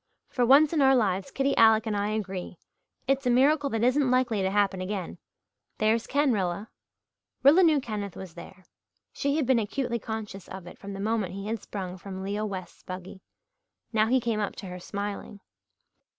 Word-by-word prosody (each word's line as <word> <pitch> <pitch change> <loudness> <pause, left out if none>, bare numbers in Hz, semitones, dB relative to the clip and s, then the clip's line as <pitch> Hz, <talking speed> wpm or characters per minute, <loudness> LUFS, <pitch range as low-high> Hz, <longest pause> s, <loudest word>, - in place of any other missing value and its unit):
For 250 - 0
once 285 +5 +6
in 310 - +2
our 270 0 +6
lives 195 -5 +1
Kitty 275 0 0
Alec 220 0 +6
and 215 -2 -1
I 205 0 0
agree. 195 -5 -4 0.5
It's 275 -1 +1
a - - +4
miracle 280 +4 +3
that 225 -3 -1
isn't 255 +2 +3
likely 250 -5 +2
to 190 - +1
happen 195 -1 +1
again. 185 -1 -4 0.6
There's 220 +1 +1
Ken, 285 -2 +2
Rilla." 195 +1 -2 0.7
Rilla 295 +7 +7
knew 315 -5 +5
Kenneth 210 -6 -5
was 185 -4 -9
there. 185 +2 -12 0.5
She 280 0 0
had 305 -3 +1
been 255 -1 +3
acutely 235 +2 -2
conscious 210 -3 -6
of 190 -2 -8
it 175 - -12
from 200 0 -7
the 195 - -7
moment 205 -3 -1
he 195 0 -6
had 220 0 -3
sprung 185 -2 -6
from 190 +1 -7
Leo 205 +2 -2
West's 190 -3 -7
buggy. 185 +1 -8 0.7
Now 215 0 +3
he 260 +3 +3
came 230 -3 -1
up 205 - -2
to - - -8
her 180 -1 -7
smiling. 200 +2 -5
215 Hz, 190 wpm, -27 LUFS, 195-255 Hz, 0.7 s, Rilla